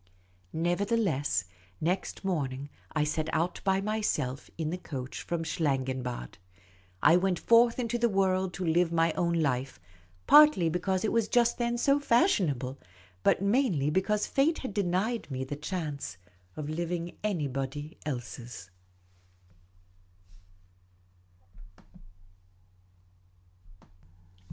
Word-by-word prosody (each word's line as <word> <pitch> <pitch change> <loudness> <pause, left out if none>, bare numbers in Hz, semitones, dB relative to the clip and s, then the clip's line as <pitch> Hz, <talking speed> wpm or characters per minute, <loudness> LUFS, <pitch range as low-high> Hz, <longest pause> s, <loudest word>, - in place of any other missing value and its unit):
Nevertheless, 175 - 0 0.3
next 185 +4 -2
morning 140 -6 -2 0.2
I 150 - +1
set 155 +1 -1
out 170 +3 -1
by 195 0 +2
myself 195 -11 -2
in 160 -1 -2
the 180 - -2
coach 130 -7 -6
from 170 -1 -3
Schlangenbad. 130 - -2 0.6
I 165 - +7
went 180 -1 +1
forth 230 +3 +4
into 240 -1 -1
the 235 0 +3
world 190 -2 +1
to 185 - -3
live 170 +1 +2
my 165 -1 +2
own 170 -1 0
life, 135 -5 -1 0.5
partly 295 - +7
because 185 +3 -1
it - - 0
was 230 -2 +2
just 235 +2 +2
then 240 0 0
so 275 +3 +3
fashion 240 - +3
able, 130 0 -4 0.4
but 185 - +2
mainly 200 - +2
because 205 +5 +1
fate 300 +4 +2
had 210 - -4
denied 200 +4 -1
me 130 -1 -3
the 130 +2 -5
chance 150 - -4 0.4
of 150 - -4
living 170 +2 -3
anybody 145 -5 -3
else's. 120 -8 -6
170 Hz, 115 wpm, -29 LUFS, 145-205 Hz, 0.6 s, I